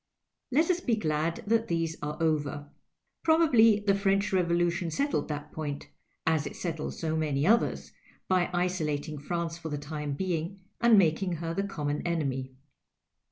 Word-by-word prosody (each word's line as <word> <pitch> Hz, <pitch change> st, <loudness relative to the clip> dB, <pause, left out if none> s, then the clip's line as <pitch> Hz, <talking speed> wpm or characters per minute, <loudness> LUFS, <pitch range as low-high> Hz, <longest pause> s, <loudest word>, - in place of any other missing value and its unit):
Let 315 Hz, +7 st, +3 dB
us 355 Hz, -, 0 dB
be 245 Hz, -9 st, +1 dB
glad 160 Hz, -4 st, -1 dB
that 225 Hz, +1 st, +2 dB
these 165 Hz, -1 st, -1 dB
arc 150 Hz, 0 st, -4 dB
over. 145 Hz, -2 st, -1 dB, 0.5 s
Probably 245 Hz, -10 st, +5 dB
the 205 Hz, -1 st, +3 dB
French 195 Hz, 0 st, +1 dB
Revolu 175 Hz, -2 st, +2 dB
tion 175 Hz, -1 st, -3 dB
settled 280 Hz, -, 0 dB
that 150 Hz, 0 st, -5 dB
point, 145 Hz, -2 st, -5 dB, 0.4 s
as 160 Hz, -2 st, +2 dB
it -, -, -8 dB
settled 165 Hz, -3 st, -4 dB
so 160 Hz, -1 st, -2 dB
many 150 Hz, -2 st, 0 dB
others, 230 Hz, +5 st, +2 dB, 0.4 s
by 185 Hz, -2 st, +2 dB
isolating 155 Hz, -4 st, -1 dB
France 170 Hz, +2 st, -3 dB
for 160 Hz, -1 st, -6 dB
the 145 Hz, -, -2 dB
time 150 Hz, 0 st, -4 dB
being, 180 Hz, +3 st, -2 dB, 0.2 s
and 235 Hz, -2 st, +6 dB
making 180 Hz, 0 st, +3 dB
her 165 Hz, 0 st, -3 dB
the 195 Hz, -, 0 dB
common 150 Hz, -7 st, -2 dB
enemy. 135 Hz, -6 st, -2 dB
170 Hz, 160 wpm, -29 LUFS, 150-195 Hz, 0.5 s, and